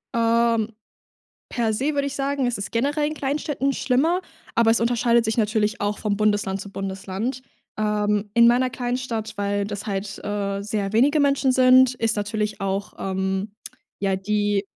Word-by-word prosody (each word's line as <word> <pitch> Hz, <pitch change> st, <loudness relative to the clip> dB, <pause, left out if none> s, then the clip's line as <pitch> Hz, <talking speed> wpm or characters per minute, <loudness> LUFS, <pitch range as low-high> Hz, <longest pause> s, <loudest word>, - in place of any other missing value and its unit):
Ähm. 230 Hz, -1 st, +2 dB, 0.8 s
Per 230 Hz, -2 st, 0 dB
se 275 Hz, +7 st, -1 dB
würde 280 Hz, 0 st, +1 dB
ich 280 Hz, -, -3 dB
sagen, 275 Hz, -1 st, -1 dB
es 240 Hz, -4 st, -1 dB
ist 200 Hz, -, -5 dB
generell 290 Hz, +5 st, 0 dB
in 305 Hz, -, -4 dB
Kleinstädten 275 Hz, -1 st, -1 dB
schlimmer, 305 Hz, +9 st, +1 dB, 0.3 s
aber 230 Hz, -1 st, +3 dB
es 225 Hz, -, +4 dB
unterscheidet 235 Hz, 0 st, +2 dB
sich 220 Hz, -, 0 dB
natürlich 215 Hz, -1 st, 0 dB
auch 205 Hz, 0 st, -1 dB
vom 205 Hz, -2 st, -1 dB
Bundesland 205 Hz, -2 st, 0 dB
zu 200 Hz, -, -9 dB
Bundesland. 195 Hz, +6 st, -4 dB, 0.3 s
Ähm, 210 Hz, -1 st, 0 dB
in 235 Hz, 0 st, +7 dB
meiner 250 Hz, +2 st, +3 dB
kleinen 245 Hz, 0 st, -2 dB
Stadt, 230 Hz, -4 st, -4 dB
weil 205 Hz, 0 st, -1 dB
das 205 Hz, +1 st, -6 dB
halt, 195 Hz, 0 st, -4 dB
äh, 200 Hz, -1 st, -2 dB
sehr 205 Hz, -1 st, -3 dB
wenige 285 Hz, +7 st, +4 dB
Menschen 280 Hz, -2 st, +3 dB
sind, 255 Hz, 0 st, +5 dB
ist 225 Hz, -2 st, 0 dB
natürlich 210 Hz, 0 st, -2 dB
auch, 195 Hz, +1 st, -2 dB
ähm 190 Hz, +1 st, -2 dB, 0.5 s
ja, 195 Hz, -1 st, +1 dB
die 205 Hz, +1 st, 0 dB
220 Hz, 165 wpm, -23 LUFS, 205-255 Hz, 0.8 s, in